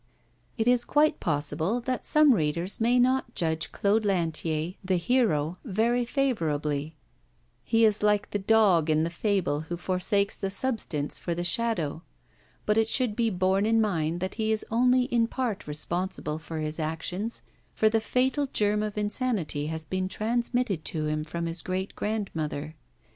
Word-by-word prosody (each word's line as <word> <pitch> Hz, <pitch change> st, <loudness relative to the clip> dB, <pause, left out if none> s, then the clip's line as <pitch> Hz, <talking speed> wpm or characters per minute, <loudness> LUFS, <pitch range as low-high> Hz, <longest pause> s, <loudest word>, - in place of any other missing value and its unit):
It 225 Hz, 0 st, 0 dB
is 245 Hz, -1 st, +4 dB
quite 300 Hz, +3 st, +2 dB
possible 160 Hz, +7 st, 0 dB
that 255 Hz, +1 st, -2 dB
some 300 Hz, -3 st, +6 dB
readers 170 Hz, +2 st, 0 dB
may 240 Hz, +2 st, +3 dB
not 255 Hz, -1 st, +2 dB
judge 160 Hz, -2 st, -1 dB
Claude 210 Hz, +2 st, +1 dB
Lantier, 165 Hz, -3 st, -1 dB
the 185 Hz, 0 st, +1 dB
'hero,' 175 Hz, -, +1 dB
very 235 Hz, +2 st, +1 dB
favourably; 155 Hz, -, -1 dB, 0.7 s
he 225 Hz, -1 st, +3 dB
is 215 Hz, -1 st, +3 dB
like 210 Hz, -1 st, +1 dB
the 205 Hz, -, -1 dB
dog 190 Hz, -6 st, +3 dB
in 155 Hz, 0 st, +3 dB
the 165 Hz, -, -2 dB
fable 185 Hz, -5 st, 0 dB
who 175 Hz, -, -3 dB
forsakes 195 Hz, +3 st, +1 dB
the 195 Hz, -, -3 dB
substance 200 Hz, -, -1 dB
for 170 Hz, -, -3 dB
the 175 Hz, -, -2 dB
shadow; 175 Hz, -5 st, -1 dB, 0.6 s
but 210 Hz, +1 st, +3 dB
it 220 Hz, -, +2 dB
should 240 Hz, -2 st, +1 dB
be 230 Hz, -1 st, +1 dB
borne 190 Hz, +1 st, +1 dB
in 225 Hz, 0 st, +3 dB
mind 170 Hz, -5 st, 0 dB
that 190 Hz, 0 st, -2 dB
he 220 Hz, 0 st, +1 dB
is 220 Hz, -, -1 dB
only 250 Hz, +2 st, +4 dB
in 240 Hz, -3 st, +1 dB
part 235 Hz, -, -3 dB
responsible 155 Hz, 0 st, -2 dB
for 160 Hz, 0 st, -7 dB
his 155 Hz, +1 st, -3 dB
actions, 170 Hz, +8 st, -3 dB, 0.3 s
for 220 Hz, -, +3 dB
the 220 Hz, 0 st, +2 dB
fatal 260 Hz, +5 st, +1 dB
germ 210 Hz, 0 st, +1 dB
of 215 Hz, -1 st, -4 dB
insanity 205 Hz, -, -1 dB
has 160 Hz, 0 st, -5 dB
been 185 Hz, +2 st, -2 dB
transmitted 235 Hz, -3 st, -1 dB
to 155 Hz, 0 st, -2 dB
him 155 Hz, 0 st, -1 dB
from 170 Hz, +2 st, -4 dB
his 165 Hz, 0 st, -3 dB
great 185 Hz, +2 st, -3 dB
grandmother. 160 Hz, -8 st, -3 dB
195 Hz, 165 wpm, -27 LUFS, 160-225 Hz, 0.7 s, some